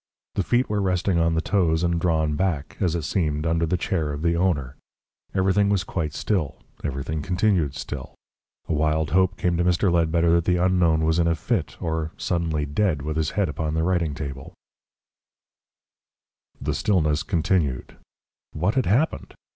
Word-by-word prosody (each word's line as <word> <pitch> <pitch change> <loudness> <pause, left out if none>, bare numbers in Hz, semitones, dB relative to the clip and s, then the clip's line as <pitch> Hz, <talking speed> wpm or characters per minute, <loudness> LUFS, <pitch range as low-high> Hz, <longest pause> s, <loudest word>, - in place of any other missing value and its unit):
The - - 0
feet 120 +7 +1
were 105 -1 -1
resting 90 -1 +1
on 85 0 +2
the 80 - 0
toes 85 -5 +2
and 85 -1 +1
drawn 80 -3 +1
back, 80 -4 -1
as 85 -4 +1
it 85 - -2
seemed, 75 -2 -1
under 80 0 +1
the 90 - +1
chair 85 -4 -1
of 75 +2 -5
the 85 0 +2
owner. 75 -7 0 0.6
Everything 95 +2 +3
was 100 -3 +1
quite 75 -6 -3
still, 90 -10 -1 0.3
everything 75 +2 -3
continued 90 -4 +1
still. 70 -2 -6 0.5
A - - -1
wild 75 0 +1
hope 95 +2 +2
came 85 -1 0
to 85 - +2
Mr. 90 +2 +2
Ledbetter 85 0 +2
that 85 -1 +3
the 90 -1 +2
unknown 85 -3 +2
was 80 +1 +2
in 85 - +3
a 85 - +2
fit 100 0 -2
or 80 -1 -2
suddenly 80 -4 -1
dead, 75 0 0
with 75 +1 -3
his 80 -2 0
head 100 -3 +3
upon 75 +1 -3
the 80 - +1
writing 85 -4 0
table.... 70 -3 -7 2.0
The - - -2
stillness 80 -7 +1
continued. 80 -7 -1 0.6
What 90 +7 0
had 130 -1 +1
happened? 130 - 0
85 Hz, 170 wpm, -24 LUFS, 75-90 Hz, 2.0 s, Everything